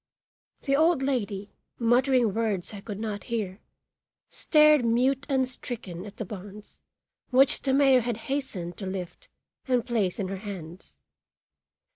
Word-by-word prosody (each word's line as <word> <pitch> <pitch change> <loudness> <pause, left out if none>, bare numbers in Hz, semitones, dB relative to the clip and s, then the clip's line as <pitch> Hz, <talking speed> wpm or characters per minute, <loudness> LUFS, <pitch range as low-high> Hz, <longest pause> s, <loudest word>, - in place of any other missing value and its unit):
The 275 -1 +1
old 320 -1 +3
lady, 210 -7 -2 0.3
muttering 245 -1 +3
words 215 -4 -2
I 200 - -7
could 205 -1 -7
not 210 -2 -4
hear, 210 -5 -3 0.7
stared 300 -3 +5
mute 250 +4 +1
and 265 -2 +2
stricken 215 -7 -6
at 205 - -12
the 220 - -4
bonds 205 +1 -10 0.5
which 265 +2 +4
the 270 - 0
mayor 270 -2 +5
had 235 -1 -2
hastened 240 -11 -3
to 195 - -5
lift 190 - -6 0.4
and 250 -3 +1
place 215 -7 0
in 195 -3 -3
her 195 - -4
hands. 185 -4 -9
230 Hz, 140 wpm, -27 LUFS, 195-265 Hz, 0.7 s, stared